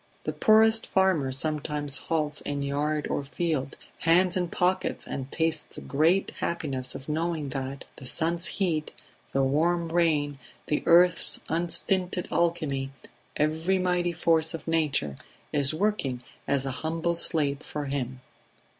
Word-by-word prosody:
The - - -2
poorest 220 0 +4
farmer 185 -8 +2
sometimes 150 0 -1
halts 150 -2 -1
in 140 -1 -3
yard 150 +2 -1
or 145 - -1
field, 145 -1 -2 0.2
hands 175 +2 +4
in 180 -1 0
pockets, 180 +2 0
and 135 0 -5
tastes 160 -2 -1
the - - -7
great 165 +7 +2
happiness 140 -7 -3
of 135 - -8
knowing 160 -1 -1
that 135 0 -5
the 130 - -6
sun's 170 +4 0
heat, 165 -6 -1 0.4
the 135 - +2
warm 165 +5 +1
rain, 150 -5 +1 0.3
the 150 - 0
earth's 175 +1 +5
unstinted 180 +2 0
alchemy 155 -6 0 0.5
every 160 +5 +1
mighty 180 -1 +1
force 165 -1 +1
of 165 - -9
nature 150 - 0 0.4
is 140 -2 +3
working 155 -9 -1 0.2
as 140 -1 +1
a 135 - -1
humble 165 +6 -1
slave 150 -4 +1
for 150 -1 -5
him 130 -2 -3
155 Hz, 135 wpm, -27 LUFS, 140-170 Hz, 0.5 s, earth's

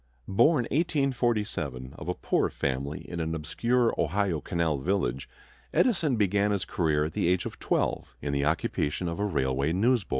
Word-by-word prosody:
Born 120 +7 +4
(1847) 120 - 0
of - - -6
a - - 0
poor - - +1
family 70 +2 -3
in 85 - -5
an 80 0 -1
obscure 115 +9 +1
Ohio 90 -1 0
canal 85 -6 0
village, 70 -6 -1 0.5
Edison 170 - +3
began 100 -1 +2
his 100 -1 0
career 75 -6 +1
at 75 - -5
the - - 0
age 90 0 +2
of - - -6
twelve - - -1
in 70 - -3
the 70 0 +1
occupation 75 +2 0
of 85 +3 -3
a 105 - +1
railway 70 -4 0
newsboy. 115 +1 +2
90 Hz, 165 wpm, -28 LUFS, 75-115 Hz, 0.5 s, Born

